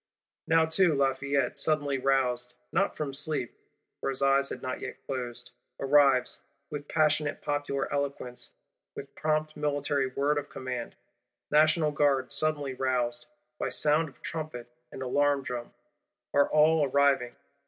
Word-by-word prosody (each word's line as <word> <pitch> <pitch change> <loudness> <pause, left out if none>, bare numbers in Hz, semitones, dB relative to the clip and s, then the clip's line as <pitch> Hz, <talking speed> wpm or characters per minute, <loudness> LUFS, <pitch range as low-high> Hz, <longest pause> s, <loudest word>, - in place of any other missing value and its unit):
Now 165 0 +4
too 160 0 +3
Lafayette, 135 -1 0
suddenly 145 -3 +1
roused, 125 -2 +1 0.2
not 195 - 0
from 145 -3 -3
sleep 145 -3 -1 0.4
(for - - -2
his 135 0 -2
eyes 135 0 +3
had - - -7
not 130 - -4
yet - - -8
closed), 125 -3 -5 0.3
arrives; 135 -2 +3 0.3
with 145 -1 -6
passionate 150 -1 +1
popular 145 -1 -2
eloquence, 140 -3 -3 0.5
with - - -9
prompt 155 0 -1
military 145 -2 0
word 140 +3 0
of 145 - -9
command. 125 -2 -5 0.6
National 155 +1 +4
Guards, 140 -4 +1
suddenly 145 -3 +1
roused, 125 -2 -1 0.3
by - - -1
sound 155 +1 +2
of 135 - -23
trumpet 155 -7 -5 0.2
and 130 - -6
alarm 145 +2 +1
drum, 120 -2 -5 0.6
are 145 - +4
all 155 +1 +4
arriving. 140 -3 +2
140 Hz, 135 wpm, -28 LUFS, 130-150 Hz, 0.6 s, Now